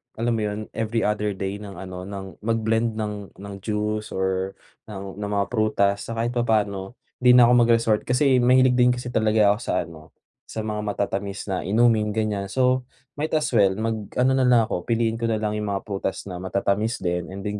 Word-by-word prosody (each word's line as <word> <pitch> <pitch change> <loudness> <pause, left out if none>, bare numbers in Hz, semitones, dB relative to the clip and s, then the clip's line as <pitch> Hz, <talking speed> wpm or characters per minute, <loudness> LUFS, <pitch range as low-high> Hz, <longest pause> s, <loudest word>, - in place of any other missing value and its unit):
alam 120 +2 0
mo 115 -1 0
'yon, 105 0 -4
every 115 0 -1
other 105 -1 0
day 95 +1 -4
ng, 100 -2 -9
ano, 90 +1 -7
ng 95 -1 -8
mag 115 +2 0
blend 115 0 +1
ng 105 -2 -5
ng 100 0 -8
juice 105 +1 -3
or 95 0 -1 0.3
ng 100 -2 -8
ng 105 0 -3
mga 100 0 +2
prutas. 105 -3 +1
Sa 115 - -4
kahit 115 +1 -1
papaano 110 -3 0 0.2
'di 125 0 +6
na 125 - +8
ako - - +5
mag-resort 115 -2 +3
kasi 130 +1 +3
mahilig 125 0 +4
din 125 0 +5
kasi 125 0 -6
talaga 110 -2 +3
ako 105 - 0
sa, - - -1
ano, 80 -1 -14 0.3
sa 110 - -5
mga 105 -1 -3
matatamis 100 -1 -3
na 95 - 0
inumin, 110 0 +2
ganiyan. 105 -3 -1
So 125 +3 +1 0.3
might 155 +1 -1
as 155 -1 0
well 100 -5 +4
mag-ano 110 +3 -1
nalang 125 -3 +4
ako, 90 - -3
piliin 115 -1 0
ko 115 - 0
nalang 110 -1 0
'yong 105 - -3
mga 100 -1 -2
prutas 100 -2 -3
na 90 - -6
matatamis 100 +4 -1
din 90 -1 -1
and 95 +1 -8
then 105 0 -3
105 Hz, 200 wpm, -24 LUFS, 100-115 Hz, 0.3 s, na